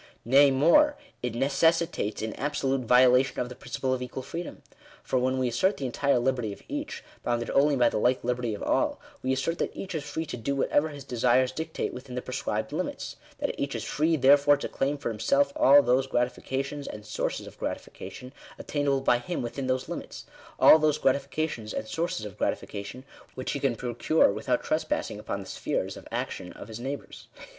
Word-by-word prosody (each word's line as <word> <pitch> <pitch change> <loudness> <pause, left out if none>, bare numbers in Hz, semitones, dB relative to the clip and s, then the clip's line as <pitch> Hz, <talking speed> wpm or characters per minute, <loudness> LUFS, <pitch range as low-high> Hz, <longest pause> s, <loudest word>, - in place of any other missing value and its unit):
Nay 140 +4 +6
more, 170 - +5 0.2
it 125 -2 -3
necessitates 145 -3 +1
an 110 - -3
absolute 135 -3 -1
violation 125 +2 +5
of 125 - -2
the 125 - -8
principle 130 +1 -2
of 130 - -2
equal 125 +1 -5
freedom. 170 +5 -7 0.4
For 130 - 0
when 130 +1 +1
we 130 -1 +1
assert 185 - +1
the 135 - -4
entire 140 +2 +1
liberty 125 -3 0
of 100 - -10
each, - - -5 0.2
bounded 120 -1 -1
only 145 +1 +4
by 120 -2 +4
the - - -1
like 125 +3 +2
liberty 125 -2 -1
of - - -7
all, - - +1 0.2
we 130 - 0
assert 135 +6 -1
that - - -2
each 190 - -6
is 155 -3 -2
free 155 +2 -4
to 155 - -5
do 140 +5 -2
whatever 145 +3 +2
bis 145 -2 -9
desires 125 0 +2
dictate, 160 0 -4
within 125 0 -8
the 125 - -2
prescribed 110 -4 -3
limits - - -3
— - - -25
that - - -1
each 140 0 -2
is - - -3
free, 160 +3 +1
therefore, 145 +1 +6
to - - -4
claim 140 +2 -1
for 140 - -3
himself 140 +6 +1
all 140 +2 +7
those 130 +2 +2
gratifications, 135 +3 -2
and 105 0 -8
sources 105 - -3
of - - -13
gratification, 125 +1 -6 0.2
attainable 140 -2 0
by 120 -2 +3
him 175 +3 -4
within 130 +3 -4
those 130 0 0
limits - - -7 0.2
— - - -21
all 160 - +8
those 155 -1 +2
gratifications, 135 -4 -1
and 110 - -3
sources 160 -9 -2
of 105 - -9
gratification 105 +6 -3 0.3
which 130 - -3
he 140 - -2
can 135 -3 +1
procure 120 +2 +2
without - - -1
trespass - - -1
ing - - -7
upon - - -4
the - - -9
spheres - - -3
of - - -11
action 90 - -4
of 105 - -11
his 110 0 -7
neighbours. 135 +3 -6
130 Hz, 200 wpm, -27 LUFS, 125-145 Hz, 0.4 s, all